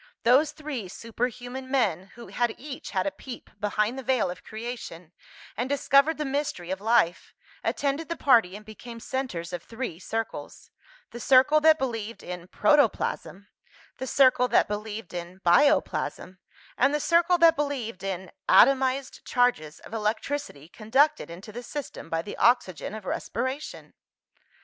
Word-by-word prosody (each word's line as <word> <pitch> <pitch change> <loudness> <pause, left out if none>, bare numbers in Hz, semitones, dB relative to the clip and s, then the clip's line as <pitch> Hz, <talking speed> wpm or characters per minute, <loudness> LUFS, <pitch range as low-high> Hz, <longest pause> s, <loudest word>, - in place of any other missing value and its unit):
Those 270 +6 +4
three 290 -10 -6
superhuman 245 +5 -5
men, 205 -9 0
who 235 - -11
had 240 -2 -1
each 275 0 -8
had 185 -2 -1
a - - 0
peep 265 -4 -10
behind 210 +4 0
the - - -7
veil 250 -8 +1
of 180 - -10
creation, 215 -7 -7 0.4
and 245 +5 -2
discovered 280 +2 +3
the 300 - -2
mystery 270 -11 -3
of 190 +1 -3
life, 220 -6 +1 0.3
attended 290 +3 -1
the 335 - -2
party 225 -9 +4
and 210 +1 -10
became 230 +2 -10
centres 230 -11 -4
of 175 - -4
three 230 -8 -6
circles 225 +3 -5 0.4
the 240 - -8
circle 265 +5 +5
that 315 0 +6
believed 230 -5 -4
in 180 -1 -7
"protoplasm," 285 -6 +1 0.5
the 260 - -4
circle 255 -1 +4
that 240 - +3
believed 210 -2 -5
in 175 +1 -7
"bioplasm," 185 -2 +2 0.4
and 275 +4 +4
the - - 0
circle 340 +3 +3
that 335 -1 +6
believed 265 - -3
in 190 -1 -5 0.2
"atomized 265 +1 +4
charges 240 - 0
of - - -13
electricity, 220 - -3
conducted 235 - +1
into 180 +6 -10
the 240 +3 -7
system 280 - -7
by 165 0 -1
the 205 - -7
oxygen 215 - +1
of 215 -3 -9
respiration." 260 +10 -4
240 Hz, 150 wpm, -26 LUFS, 200-275 Hz, 0.5 s, that